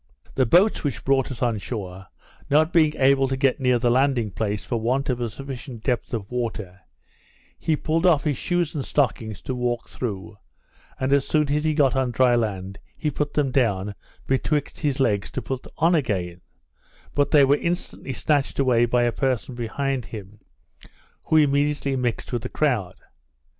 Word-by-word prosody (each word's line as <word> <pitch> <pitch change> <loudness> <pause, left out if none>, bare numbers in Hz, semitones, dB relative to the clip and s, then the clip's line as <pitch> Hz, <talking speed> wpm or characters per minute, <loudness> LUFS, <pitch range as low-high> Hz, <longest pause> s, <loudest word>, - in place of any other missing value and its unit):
The 130 -3 +2
boats 185 - +4
which 145 -5 -3
brought 135 -1 +2
us 125 -1 -4
on 115 -3 +1
shore, 95 -4 -6 0.4
not 155 +3 +3
being 155 -3 +4
able 135 0 +4
to 135 0 -2
get 135 0 +2
near 125 -2 +3
the 120 0 +1
landing 130 -4 +2
place 105 +1 -3
for 120 - -1
want 130 +4 0
of 125 -1 -3
a 120 - -1
sufficient 130 0 -8
depth 125 -3 -1
of 110 -3 -4
water, 110 -7 -4 0.8
he 160 - +1
pulled 165 +4 0
off 160 -5 +4
his 150 -3 0
shoes 175 +3 -1
and 145 - -3
stockings 110 -8 -1
to 130 - -4
walk 120 -2 -2
through, 105 -3 -5 0.6
and 130 +1 +1
as 140 -1 +2
soon 150 -2 +1
as 150 +1 0
he 155 -1 +1
got 135 -4 +3
on 130 -1 +1
dry 120 +1 +3
land, 100 -4 -2 0.2
he 150 - -1
put 145 +1 -3
them 145 -3 +1
down 105 -6 +1 0.3
betwixt 145 +2 -1
his 145 -3 -1
legs 105 -7 +1
to - - -4
put 130 -1 -5
on 165 +3 +3
again, 95 - -1 0.7
but 145 -1 +2
they 145 -2 +6
were 140 +2 +4
instantly 170 -5 -3
snatched 145 +2 0
away 125 -3 +3
by 120 +1 +2
a 120 - +2
person 130 0 -1
behind 125 +2 -2
him, 105 -1 -10 0.9
who 160 - +4
immediately 145 -1 +2
mixed 125 -1 -2
with 120 - -1
the - - -5
crowd. 115 -12 0
130 Hz, 180 wpm, -24 LUFS, 115-145 Hz, 0.9 s, they